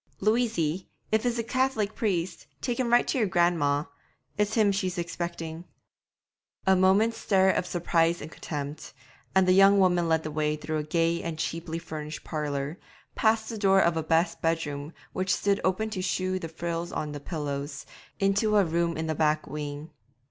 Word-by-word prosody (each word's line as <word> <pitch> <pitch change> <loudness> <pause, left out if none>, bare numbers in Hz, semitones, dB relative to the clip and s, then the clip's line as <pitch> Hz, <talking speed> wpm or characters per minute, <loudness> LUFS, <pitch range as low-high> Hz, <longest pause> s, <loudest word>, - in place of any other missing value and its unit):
'Louisy, 210 -6 +1 0.2
if 220 0 +2
it's 240 0 0
a 230 - 0
Cath'lic 230 -4 0
priest, 185 -6 -2
take 245 -1 -2
him 240 -2 0
right 240 - +7
in - - -8
to - - -1
your 215 - +2
gran'ma; 165 -5 +2 0.5
it's 210 +1 0
him 215 -3 +4
she's 190 -2 -2
expecting.' 170 -1 -4 1.0
A 190 0 +5
moment's 195 +5 +3
stare 190 -1 +3
of 180 - -1
surprise 170 -1 +1
and 155 - -8
contempt, 145 -2 -6 0.4
and 190 -1 +5
the - - +5
young 195 +1 +7
woman 180 -3 +3
led 160 0 +2
the 155 - -4
way 150 0 0
through 155 +1 -3
a - - -2
gay 165 +2 +1
and 165 -2 -4
cheaply 165 +1 -3
furnished 155 -2 -6
parlour, 150 +1 -3 0.3
past 220 0 +2
the 225 -2 -5
door 195 -1 +5
of 170 -3 +3
a 160 - 0
best 165 +2 +1
bedroom 155 -3 -1 0.2
which 185 0 -1
stood 200 -1 +1
open 215 +4 0
to 190 -4 -3
shew 185 0 -1
the 165 - -6
frills 170 +1 -4
on 150 - -3
the 145 - -6
pillows, 145 -2 -4 0.3
into 200 +2 +2
a 200 - +5
room 170 0 0
in 160 - -2
the 160 - -1
back 155 0 +1
wing. 150 +1 -6
170 Hz, 185 wpm, -27 LUFS, 155-195 Hz, 1.0 s, right